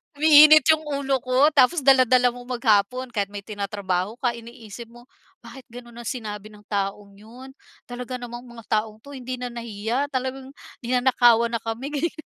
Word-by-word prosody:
Umiinit 305 0 +7
yung 315 0 0
ulo 275 -2 -1
ko, 255 +5 +2
tapos 285 +2 +3
dala-dala 255 -2 +4
mo 245 0 -12
maghapon 245 0 0
kahit 205 -3 -2
may 200 0 -9
tinatrabaho 200 -1 -4
ka 245 - +1
iniisip 235 -1 -11
mo, 240 +1 -17 0.4
"Bakit 265 -2 -13
ganun 240 0 -13
ang 240 - -8
sinabi 215 -4 -6
ng 210 - -17
taong 200 0 -3
yun?" 245 +5 -13 0.4
Talaga 250 +1 -6
namang 240 0 -9
mga 235 -1 -13 0.2
taong 215 -1 -13
'to 285 - -13
hindi 255 0 -6
na 250 0 -6
nahiya, 235 +3 -4
talagang 260 +1 -5 0.3
ninanakawan 240 -2 +3
na 230 - -2
kami, 230 +5 -6
ganyan. 300 +3 -3
245 Hz, 165 wpm, -23 LUFS, 220-260 Hz, 0.4 s, Umiinit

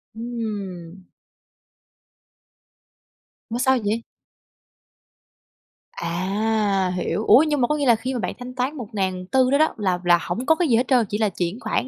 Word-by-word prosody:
Ừm. 200 -7 -6 2.5
Mà 235 +2 -3
sao 260 +1 +3
vậy? 220 +3 -1 1.9
À, 195 +2 0
hiểu. 180 +3 -2
Ủa, 275 - +7
nhưng 295 -3 0
mà 240 - +3
có 300 - 0
nghĩa 290 -1 -1
là 240 -3 +5
khi 250 +4 -4
mà 250 - -2
bạn 185 - -3
thanh 250 0 -8
toán 260 +4 -1
1400 205 +2 -1
đó 280 - +4
đó 315 +1 +2
là 185 -4 0
là 175 -1 +4
hổng 180 +11 -4
có 320 - +4
cái 350 0 0
gì 240 - +3
hết 245 +3 +1
trơn, 250 -4 +3
chỉ 205 - -2
là 215 -1 +1
chuyển 180 +3 -3
khoản - - -2
220 Hz, 160 wpm, -22 LUFS, 190-255 Hz, 2.5 s, Ủa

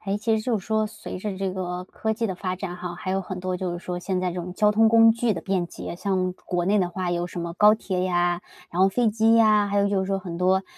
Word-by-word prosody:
哎， 195 0 -2
其 220 +1 +1
实 215 - -3
就 230 -2 0
是 190 - -12
说 215 0 +1
随 210 - -8
着 195 0 -4
这 190 -1 -2
个 180 -1 -4
科 220 +4 -3
技 225 +1 -1
的 190 - -3
发 185 0 -3
展 185 -1 -5
哈， 180 -1 -6
还 185 +1 -5
有 195 - 0
很 180 0 -6
多 185 0 -2
就 180 -1 -3
是 175 - -4
说 180 0 -5
现 185 0 -2
在 180 0 -1
这 - - -7
种 180 +1 -6
交 210 +2 +3
通 220 +1 +4
工 225 0 +7
具 230 0 0
的 175 - -4
便 190 -3 -1
捷， 170 - -7
像 185 -1 -1
国 175 -1 -1
内 205 +2 +3
的 180 -2 +1
话 180 0 -3
有 175 0 -1
什 175 - -6
么 170 0 -4
高 210 +3 +6
铁 190 -4 -3
呀， 175 -1 +1 0.3
然 175 - -2
后 190 - +6
飞 240 +3 +2
机 225 +1 +3
呀， 215 -2 +5
还 200 0 0
有 200 0 +3
就 200 -1 +1
是 190 - -2
说 195 0 0
很 180 -3 -6
多， 185 +2 +2
190 Hz, 320 characters per minute, -24 LUFS, 180-210 Hz, 0.3 s, 工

